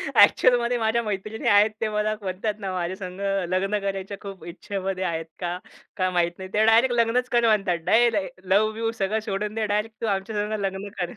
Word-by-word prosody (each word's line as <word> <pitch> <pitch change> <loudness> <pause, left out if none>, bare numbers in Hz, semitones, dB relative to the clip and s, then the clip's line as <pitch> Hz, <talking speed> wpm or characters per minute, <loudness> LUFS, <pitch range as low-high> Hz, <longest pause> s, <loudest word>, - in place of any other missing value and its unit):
ॲक्चुअलमध्ये 240 +3 +5
माझ्या 225 +1 +1
मैत्रिणी 215 +1 -4
आहेत. 205 +1 +6
ते 220 - 0
मला 210 0 0
म्हणतात 195 +3 -2
ना 195 -2 -4
माझ्यासंगं 185 +1 -2
लग्न 195 +3 0
करायच्या 195 0 -4
खूप 195 -2 -9
इच्छेमध्ये 190 +1 -4
आहेत. 165 -2 -2
का? 175 -1 -2 0.4
काय 185 -1 +1
माहीत 175 -1 +1
नाही. 190 0 -8
त्या 215 +1 +3
डायरेक्ट 235 +3 +5
लग्नच 235 +2 +1
कर 235 -1 +3
म्हणतात. 195 -5 +2
डायरेक्ट 220 -3 +2
लव्ह-बिव्ह 215 +4 +1
सगळं 205 +3 0
सोडून 210 +1 -2
दे. 220 -1 0
डायरेक्ट 210 +2 -2
तू 225 - -1
आमच्यासंगं 210 +2 -1
लग्न 195 +1 -3
कर. 175 -1 -2
205 Hz, 175 wpm, -24 LUFS, 190-220 Hz, 0.4 s, आहेत